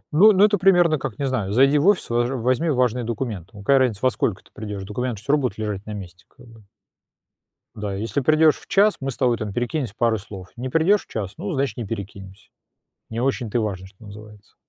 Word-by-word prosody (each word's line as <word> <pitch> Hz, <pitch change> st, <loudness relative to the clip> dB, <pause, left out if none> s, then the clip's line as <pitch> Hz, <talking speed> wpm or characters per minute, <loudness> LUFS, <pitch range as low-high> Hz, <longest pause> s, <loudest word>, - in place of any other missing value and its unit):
Ну 210 Hz, +7 st, +8 dB
ну, 200 Hz, +1 st, +5 dB
это 205 Hz, -2 st, +2 dB
примерно 175 Hz, -5 st, +4 dB
как, 130 Hz, -7 st, -5 dB
не 140 Hz, -, -2 dB
знаю, 120 Hz, -8 st, -1 dB
зайди 135 Hz, +5 st, +4 dB
в 165 Hz, -, +1 dB
офис, 205 Hz, -3 st, +3 dB
важ 120 Hz, +1 st, +1 dB
возьми 130 Hz, +5 st, 0 dB
важные 125 Hz, -3 st, +1 dB
документы. 110 Hz, -6 st, -4 dB
Какая 135 Hz, +7 st, +3 dB
разница, 120 Hz, -6 st, 0 dB
во 130 Hz, -, +4 dB
сколько 105 Hz, -4 st, -2 dB
ты -, -, -25 dB
придёшь, 105 Hz, -2 st, -6 dB
документы 110 Hz, +2 st, -4 dB
всё 140 Hz, -, 0 dB
равно 150 Hz, -, +3 dB
будут 125 Hz, -6 st, -2 dB
лежать 105 Hz, -3 st, -4 dB
на 105 Hz, -, -5 dB
месте, 90 Hz, -1 st, -10 dB
как 125 Hz, -, -19 dB
бы. 115 Hz, -2 st, -17 dB, 1.1 s
Да, 105 Hz, -1 st, -4 dB
если 115 Hz, +8 st, -2 dB
придёшь 155 Hz, +2 st, +4 dB
в -, -, -19 dB
час, 205 Hz, +1 st, +3 dB
мы 135 Hz, -, -3 dB
с 130 Hz, -, -6 dB
тобой 120 Hz, -3 st, +2 dB
там 110 Hz, -2 st, -4 dB
перекинемся 120 Hz, 0 st, -3 dB
пару 115 Hz, -2 st, +1 dB
слов, 95 Hz, -2 st, -10 dB
не 125 Hz, +2 st, -5 dB
придёшь 165 Hz, +8 st, +2 dB
в -, -, -47 dB
час, 100 Hz, -3 st, -4 dB
ну, 195 Hz, +3 st, -4 dB
значит, 135 Hz, -5 st, -1 dB
не 120 Hz, -, -4 dB
перекинемся, 100 Hz, -2 st, -8 dB, 0.6 s
не 115 Hz, +1 st, -4 dB
очень-то 125 Hz, -3 st, -1 dB
и -, -, +1 dB
важно, 95 Hz, -4 st, -4 dB
что 95 Hz, +3 st, -19 dB
называется. 105 Hz, 0 st, -13 dB
120 Hz, 225 wpm, -22 LUFS, 105-140 Hz, 1.1 s, Ну